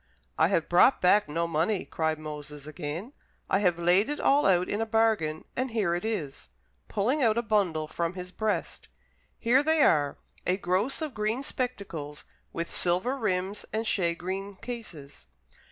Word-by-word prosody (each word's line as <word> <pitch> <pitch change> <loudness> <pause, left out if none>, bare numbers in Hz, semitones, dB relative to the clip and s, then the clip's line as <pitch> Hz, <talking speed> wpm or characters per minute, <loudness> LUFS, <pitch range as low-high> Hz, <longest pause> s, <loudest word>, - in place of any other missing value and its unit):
"I 160 - +4
have 170 -4 +1
brought 180 +9 +5
back 185 -1 +4
no 165 +3 0
money," 170 +5 0
cried 160 -1 -1
Moses 150 -2 -8
again. 160 - -6 0.4
"I 195 - +4
have 180 -4 +2
laid 180 +7 +3
it 295 - -3
all 280 -3 +4
out 180 -1 +3
in 205 - -1
a - - +1
bargain, 220 -9 +1
and 255 +1 -1
here 210 -7 0
it 175 - -2
is," 190 -12 -4 0.4
pulling 245 +9 0
out 225 -3 +3
a 235 - +1
bundle 190 -8 +1
from 170 +2 -2
his 180 -1 -7
breast: 215 +2 -2 0.5
"here 245 +4 +4
they 315 0 +3
are, 145 -3 +3 0.3
a 180 +1 +1
gross 200 - 0
of 305 -4 -4
green 215 +4 -1
spectacles, 195 - -4 0.3
with 170 0 -4
silver 185 +9 +2
rims 200 -4 -1
and 220 +1 -2
shagreen 190 +1 -1
cases." 190 - -8
190 Hz, 165 wpm, -28 LUFS, 165-225 Hz, 0.5 s, brought